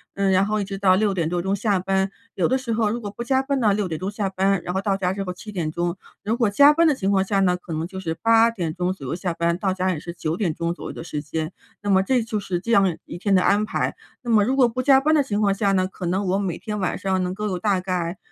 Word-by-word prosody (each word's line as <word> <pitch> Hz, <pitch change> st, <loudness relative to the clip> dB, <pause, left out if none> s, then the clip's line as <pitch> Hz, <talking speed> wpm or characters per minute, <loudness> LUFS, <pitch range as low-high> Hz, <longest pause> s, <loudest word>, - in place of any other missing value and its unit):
嗯， 195 Hz, -1 st, +1 dB
然 190 Hz, +1 st, +4 dB
后 215 Hz, +1 st, -1 dB
一 -, -, 0 dB
直 195 Hz, 0 st, -5 dB
到 190 Hz, -2 st, +4 dB
6 205 Hz, 0 st, +1 dB
点 170 Hz, -4 st, -1 dB
多 175 Hz, 0 st, -1 dB
钟 195 Hz, +2 st, 0 dB
下 200 Hz, -1 st, +1 dB
班， 190 Hz, +1 st, 0 dB, 0.3 s
有 -, -, +2 dB
的 260 Hz, -, +2 dB
时 250 Hz, -3 st, -3 dB
候 220 Hz, -1 st, +1 dB
如 235 Hz, +3 st, -2 dB
果 205 Hz, -3 st, -6 dB
不 235 Hz, -, -6 dB
加 265 Hz, +2 st, +2 dB
班 275 Hz, -1 st, -1 dB
呢， 210 Hz, -2 st, +4 dB
6 200 Hz, -2 st, -1 dB
点 160 Hz, -, -4 dB
钟 190 Hz, +2 st, -3 dB
下 205 Hz, -2 st, -2 dB
班， 190 Hz, 0 st, +1 dB
然 180 Hz, -, -4 dB
后 190 Hz, -, 0 dB
到 195 Hz, -1 st, 0 dB
家 180 Hz, -1 st, 0 dB
之 195 Hz, 0 st, -3 dB
后 180 Hz, -, -4 dB
7 210 Hz, +4 st, -9 dB
点 160 Hz, -4 st, -2 dB
钟。 175 Hz, +1 st, -2 dB, 0.3 s
如 215 Hz, +3 st, 0 dB
果 235 Hz, -4 st, +2 dB
加 285 Hz, +8 st, +6 dB
班 335 Hz, +2 st, +3 dB
的 310 Hz, -, +5 dB
情 195 Hz, -6 st, -1 dB
况 190 Hz, -1 st, +3 dB
下 195 Hz, 0 st, 0 dB
呢， 180 Hz, -2 st, +3 dB
可 180 Hz, -1 st, -10 dB
能 160 Hz, +1 st, -2 dB
就 190 Hz, -, -9 dB
是 165 Hz, -3 st, -3 dB
8 230 Hz, 0 st, +5 dB
点 175 Hz, -8 st, -3 dB
钟 180 Hz, +1 st, -1 dB
左 185 Hz, -8 st, -7 dB
右 145 Hz, -, -2 dB
下 180 Hz, -1 st, -3 dB
班， 170 Hz, 0 st, 0 dB
到 190 Hz, 0 st, 0 dB
家 185 Hz, 0 st, 0 dB
也 160 Hz, -, -3 dB
是 170 Hz, -, -7 dB
9 160 Hz, -2 st, -3 dB
点 175 Hz, -5 st, -1 dB
钟 170 Hz, +2 st, -2 dB
左 -, -, -10 dB
右 -, -, -4 dB
的 -, -, -8 dB
时 150 Hz, -3 st, -4 dB
间。 160 Hz, +3 st, -4 dB, 0.3 s
那 205 Hz, -, -3 dB
么 190 Hz, -1 st, +4 dB
这 250 Hz, +4 st, +2 dB
就 220 Hz, -2 st, -3 dB
是 180 Hz, -3 st, -2 dB
这 230 Hz, +5 st, -4 dB
样 195 Hz, -6 st, +3 dB
一 170 Hz, -, -8 dB
天 200 Hz, +2 st, 0 dB
的 185 Hz, -, +4 dB
安 205 Hz, +1 st, +3 dB
排。 215 Hz, -, -2 dB, 0.3 s
那 240 Hz, -, -5 dB
么 215 Hz, -3 st, +5 dB
如 260 Hz, +5 st, +1 dB
果 255 Hz, -3 st, +6 dB
不 250 Hz, +2 st, -3 dB
加 270 Hz, 0 st, +6 dB
班 310 Hz, +3 st, +2 dB
的 290 Hz, -, +4 dB
情 210 Hz, -6 st, -2 dB
况 200 Hz, -2 st, +3 dB
下 200 Hz, 0 st, +1 dB
呢， 185 Hz, -1 st, +2 dB
可 185 Hz, -1 st, -8 dB
能 190 Hz, +3 st, 0 dB
我 190 Hz, +2 st, +1 dB
每 190 Hz, -4 st, -2 dB
天 210 Hz, -1 st, -5 dB
晚 185 Hz, -, -1 dB
上 190 Hz, -1 st, -1 dB
能 180 Hz, 0 st, -2 dB
够 210 Hz, +2 st, -4 dB
有 185 Hz, -3 st, -2 dB
大 200 Hz, -1 st, +1 dB
概 180 Hz, -1 st, -2 dB
195 Hz, 325 characters per minute, -23 LUFS, 180-215 Hz, 0.3 s, 加